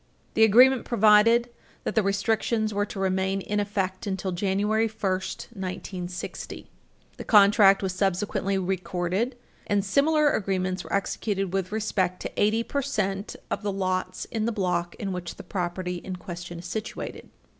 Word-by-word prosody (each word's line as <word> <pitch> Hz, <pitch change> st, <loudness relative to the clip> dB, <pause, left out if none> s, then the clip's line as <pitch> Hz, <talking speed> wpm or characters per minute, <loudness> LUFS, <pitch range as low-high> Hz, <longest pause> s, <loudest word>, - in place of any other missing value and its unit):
The 220 Hz, -, +4 dB
agreement 250 Hz, +4 st, +6 dB
provided 230 Hz, +2 st, +5 dB, 0.3 s
that -, -, -2 dB
the 220 Hz, -, +3 dB
restrictions 215 Hz, +2 st, 0 dB
were 205 Hz, +1 st, 0 dB
to 200 Hz, -, -7 dB
remain 190 Hz, 0 st, 0 dB
in 210 Hz, +2 st, -2 dB
effect 195 Hz, -2 st, -2 dB
until 190 Hz, -1 st, -2 dB
January 205 Hz, +4 st, +1 dB
1, 220 Hz, 0 st, -14 dB
1960. 185 Hz, -2 st, -5 dB, 0.5 s
The -, -, -6 dB
contract 200 Hz, -2 st, +6 dB
was 190 Hz, -1 st, -1 dB
subsequently 195 Hz, +1 st, 0 dB
recorded, 185 Hz, +5 st, -1 dB, 0.3 s
and 205 Hz, -1 st, +1 dB
similar 295 Hz, +7 st, +3 dB
agreements 185 Hz, -2 st, -1 dB
were -, -, -11 dB
executed 195 Hz, -1 st, -1 dB
with 195 Hz, -1 st, -1 dB
respect 190 Hz, -4 st, -1 dB
to -, -, -4 dB
eighty 220 Hz, +2 st, +3 dB
percent 215 Hz, -8 st, -2 dB, 0.2 s
of -, -, -1 dB
the 205 Hz, -1 st, -1 dB
lots 185 Hz, -1 st, -2 dB
in 220 Hz, -1 st, -1 dB
the 235 Hz, -, +1 dB
block 180 Hz, -5 st, -1 dB
in 195 Hz, -2 st, -4 dB
which 180 Hz, -2 st, -5 dB
the -, -, -10 dB
property 180 Hz, -1 st, -3 dB
in 185 Hz, +1 st, -6 dB
question 175 Hz, -1 st, -7 dB
is 170 Hz, -, -9 dB
situated. 215 Hz, +5 st, -5 dB
195 Hz, 150 wpm, -26 LUFS, 185-215 Hz, 0.5 s, agreement